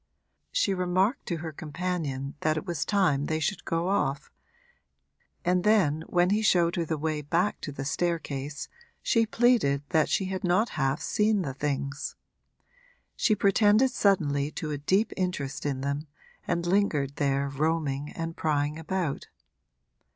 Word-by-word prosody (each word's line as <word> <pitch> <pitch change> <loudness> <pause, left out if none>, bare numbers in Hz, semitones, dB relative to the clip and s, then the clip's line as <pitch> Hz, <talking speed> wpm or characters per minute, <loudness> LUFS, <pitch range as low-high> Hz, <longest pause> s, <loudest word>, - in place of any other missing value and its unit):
She - - +2
remarked 185 +6 0
to 170 - -1
her 160 - -4
companion 150 -3 -3
that 155 +1 +1
it 155 - -4
was 170 -5 -2
time 175 -9 +2
they 155 0 0
should 185 +4 -2
go 165 +1 -1
off, 140 -8 0 1.1
and 180 0 +2
then 185 -8 +3
when 175 +1 +2
he 210 +2 +2
showed 175 -5 +3
her 170 -2 0
the 160 0 -2
way 155 0 -2
back 170 +7 0
to 150 - -5
the 135 -1 -6
staircase 145 -3 -2 0.4
she 230 -2 +3
pleaded 225 - +3
that 160 -3 +2
she 190 - +1
had 190 0 -4
not 185 +6 +2
half 135 -2 -1
seen 210 -2 +2
the 135 -4 -4
things. 140 0 -3 1.0
She 215 - +2
pretended 210 +5 +4
suddenly 150 - +2
to 155 - -4
a 145 - -3
deep 190 +9 +1
interest 150 -7 -2
in 135 -2 -2
them, 140 +3 -2 0.4
and 170 0 0
lingered 165 -7 +1
there 140 -1 +1
roaming 145 0 -1
and 165 0 -4
prying 150 0 0
about. 165 -2 -2
165 Hz, 150 wpm, -28 LUFS, 145-190 Hz, 1.1 s, pretended